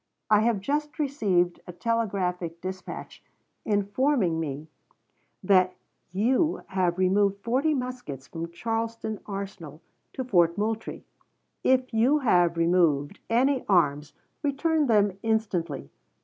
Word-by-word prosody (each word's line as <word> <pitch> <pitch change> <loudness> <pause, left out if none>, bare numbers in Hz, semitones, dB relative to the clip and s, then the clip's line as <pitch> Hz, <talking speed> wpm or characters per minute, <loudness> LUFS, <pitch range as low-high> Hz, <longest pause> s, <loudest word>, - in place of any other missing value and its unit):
I 210 - +7
have 220 -2 +1
just 295 +6 -2
received 200 - +1
a - - -6
telegraphic 180 -5 -2
dispatch 185 +1 -7 0.4
informing 205 - +1
me 150 -1 -4 0.8
that 185 -1 +4 0.4
you 255 - +1
have 185 -2 0
removed 200 +2 +2
forty 270 +6 +1
muskets 250 - -5
from 165 +2 -6
Charleston 225 +3 -3
arsenal 195 -7 -6 0.3
to 260 - -3
Fort 175 -8 +3
Moultrie. 220 +2 -3 0.6
If 255 -1 +2
you 245 +7 +4
have 175 - +3
removed 165 -2 +2
any 255 +3 +2
arms 150 -6 +2 0.3
return 300 +1 +1
them 205 -4 +2
instantly. 180 - -1
200 Hz, 110 wpm, -26 LUFS, 175-240 Hz, 0.8 s, I